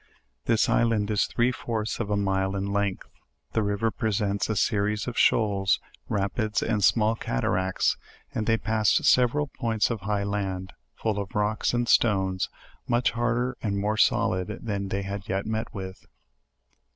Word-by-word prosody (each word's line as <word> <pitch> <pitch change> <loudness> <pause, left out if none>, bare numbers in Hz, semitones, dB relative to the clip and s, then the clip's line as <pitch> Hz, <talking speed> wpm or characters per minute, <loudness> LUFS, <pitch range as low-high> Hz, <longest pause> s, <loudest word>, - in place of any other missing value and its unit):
This 110 -2 +3
island 110 -3 +2
is 105 - +2
three 120 +2 +1
fourths 115 -3 -3
of 110 -3 -2
a 105 - +1
mile 95 -1 0
in 100 0 -2
length. 100 -2 -1 0.5
The 110 - +1
river 105 +2 0
presents 105 -3 -1
a 110 - 0
series 105 +1 +1
of 125 - -4
shoals, 100 -3 +3 0.3
ra 100 -1 +1
pids, 110 +1 -1
and 105 -3 0
small 110 +2 +4
cataracts; 95 - 0 0.4
and 110 - -2
they 115 0 +4
passed 110 -1 +2
several 130 +4 +4
points 115 -1 +1
of 115 - -2
highland, 100 -2 -2 0.2
full 110 -2 -1
of 100 -1 -6
rocks 105 +1 +1
and 120 0 0
stones, 95 -5 +2 0.4
much 120 0 +2
harder 120 +2 0
and 100 -2 -1
more 105 +2 0
solid 100 -4 +2
than 115 - -7 0.2
any - - -5
they 100 +1 -2
had 100 0 -6
yet 95 0 -1
met 110 +1 -3
with. 95 -2 -7
105 Hz, 165 wpm, -26 LUFS, 100-115 Hz, 0.5 s, small